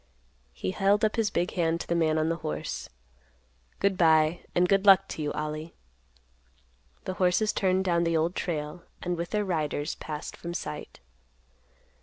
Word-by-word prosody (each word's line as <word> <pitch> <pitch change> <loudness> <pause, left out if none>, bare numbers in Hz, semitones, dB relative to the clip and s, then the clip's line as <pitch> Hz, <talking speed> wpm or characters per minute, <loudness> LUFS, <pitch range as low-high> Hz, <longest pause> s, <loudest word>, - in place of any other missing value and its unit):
He 95 - -3
held 200 - +3
up 215 - 0
his 225 -2 +1
big 175 -3 -1
hand 165 -2 0
to - - -7
the - - 0
man 160 -2 +2
on 155 0 +1
the 165 0 0
horse; 75 - -4 0.9
"Good 195 -2 +1
by, 160 0 +4 0.2
and 180 +1 +4
good 195 +1 +3
luck 195 -1 +7
to - - -5
you, 150 -1 -1
Ollie." 155 +1 -4 1.3
The 185 - -3
horses 185 +4 +3
turned 190 0 +1
down 170 -2 +2
the 165 -1 +2
Old 165 +3 +1
Trail 155 0 -3 0.2
and 180 0 -1
with 170 0 -4
their 210 -1 0
riders, 155 -4 -1
passed 150 -1 -6
from 170 0 -6
sight. 75 - -6
170 Hz, 170 wpm, -28 LUFS, 155-185 Hz, 1.3 s, luck